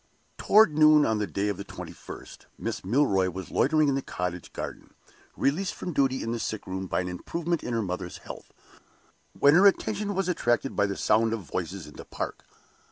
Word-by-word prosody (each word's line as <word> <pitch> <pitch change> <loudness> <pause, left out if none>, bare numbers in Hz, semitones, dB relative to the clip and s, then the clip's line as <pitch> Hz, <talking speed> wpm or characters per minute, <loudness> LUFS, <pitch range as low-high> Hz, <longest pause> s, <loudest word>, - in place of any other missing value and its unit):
Toward 210 -7 +5
noon 155 -1 +6
on 110 -1 +1
the 105 - -1
day 100 +2 -1
of 100 -3 -1
the 100 - -5
twenty - - -8
first, - - -11
Miss - - -4
Milroy 95 -4 +2
was 95 +1 -7
loitering 155 -2 +3
in 140 - +2
the 135 - 0
cottage 90 -6 -5
garden - - -7 0.4
released 175 +8 0
from 180 - -5
duty 135 -2 +1
in 115 - -2
the 120 - -2
sick 110 -1 -4
room 95 0 -4
by - - 0
an 90 - -4
improvement 165 - -3
in 120 - -3
her 115 - 0
mother's 90 -1 -4
health - - -11 0.9
when 145 - +6
her 190 +5 +7
attention 205 0 0
was 195 -1 0
attracted 135 -7 0
by 100 0 +2
the 100 - -4
sound 110 +1 +2
of 115 - -3
voices 90 +1 -5
in 75 - -13
the - - -9
park. - - -5
115 Hz, 205 wpm, -27 LUFS, 95-155 Hz, 0.9 s, her